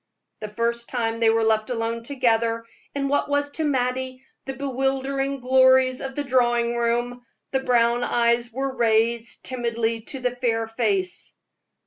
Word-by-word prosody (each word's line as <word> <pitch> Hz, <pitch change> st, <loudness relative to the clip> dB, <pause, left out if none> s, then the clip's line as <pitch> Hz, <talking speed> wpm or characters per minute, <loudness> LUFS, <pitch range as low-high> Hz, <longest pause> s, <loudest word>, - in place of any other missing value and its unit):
The 215 Hz, -, -5 dB
first 235 Hz, +2 st, -2 dB
time 230 Hz, -2 st, -1 dB
they 225 Hz, -1 st, +4 dB
were 225 Hz, 0 st, +2 dB
left 220 Hz, 0 st, +1 dB
alone 230 Hz, -1 st, -2 dB
together 230 Hz, -3 st, 0 dB, 0.3 s
in 275 Hz, -1 st, -1 dB
what 285 Hz, +1 st, 0 dB
was 285 Hz, 0 st, 0 dB
to 320 Hz, -, -3 dB
Mattie 260 Hz, -2 st, -1 dB, 0.2 s
the 270 Hz, -, -5 dB
bewildering 270 Hz, 0 st, -1 dB
glories 260 Hz, 0 st, +4 dB
of 270 Hz, -1 st, -5 dB
the 290 Hz, -, -1 dB
drawing 240 Hz, -3 st, +2 dB
room, 240 Hz, +1 st, -1 dB, 0.3 s
the 265 Hz, -, +1 dB
brown 240 Hz, -2 st, +2 dB
eyes 235 Hz, 0 st, +1 dB
were 265 Hz, +2 st, -3 dB
raised 230 Hz, 0 st, +1 dB
timidly 230 Hz, -2 st, -2 dB
to 270 Hz, -, -5 dB
the 250 Hz, -1 st, 0 dB
fair 230 Hz, -2 st, 0 dB
face. 205 Hz, -5 st, -2 dB
240 Hz, 150 wpm, -24 LUFS, 230-260 Hz, 0.3 s, they